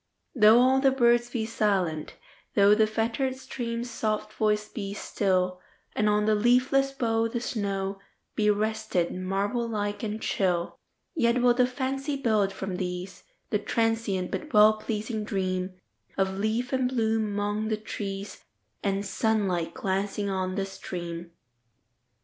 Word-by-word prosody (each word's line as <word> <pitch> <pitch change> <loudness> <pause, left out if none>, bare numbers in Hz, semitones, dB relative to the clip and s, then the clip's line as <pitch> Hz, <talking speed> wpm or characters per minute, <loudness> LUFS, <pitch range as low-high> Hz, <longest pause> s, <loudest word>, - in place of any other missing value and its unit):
Though 220 -2 +7
all 260 +2 +5
the 270 0 +5
birds 240 -2 +3
be 235 -3 -2
silent,—thoughThe 205 +1 +1
fettered 230 +4 -1
stream's 240 -2 -5
soft 215 -1 -2
voice 210 -1 +1
be 200 -3 -5
still, 185 -3 0 0.3
And 210 0 +2
on 210 0 +2
the 215 - +3
leafless 255 +5 +3
bough 230 -4 0
the 230 - -3
snowBe 200 -1 -3
rested, 215 -4 -1
marble 200 +6 -1
like 205 -2 -2
and 215 -1 -3
chill,—Yet 205 - -1
will 245 -1 +6
the 250 0 +3
fancy 270 +2 -2
build, 215 -7 +1
from 190 -1 -4
these, 180 0 -5 0.3
The - - +2
transient 225 -5 0
but 310 - -4
well 215 -1 +6
pleasing 215 0 -3
dreamOf 185 -3 -2 0.6
leaf 225 +5 -1
and 260 -1 +2
bloom 225 -3 +1
among 205 +1 -1
the 215 -1 0
trees, 200 -2 -6 0.4
And 200 0 0
sunlight 200 -7 0
glancing 200 -2 -1
on 185 -1 -2
the 195 -1 -1
stream. 175 -3 -6
215 Hz, 130 wpm, -27 LUFS, 195-235 Hz, 0.6 s, Though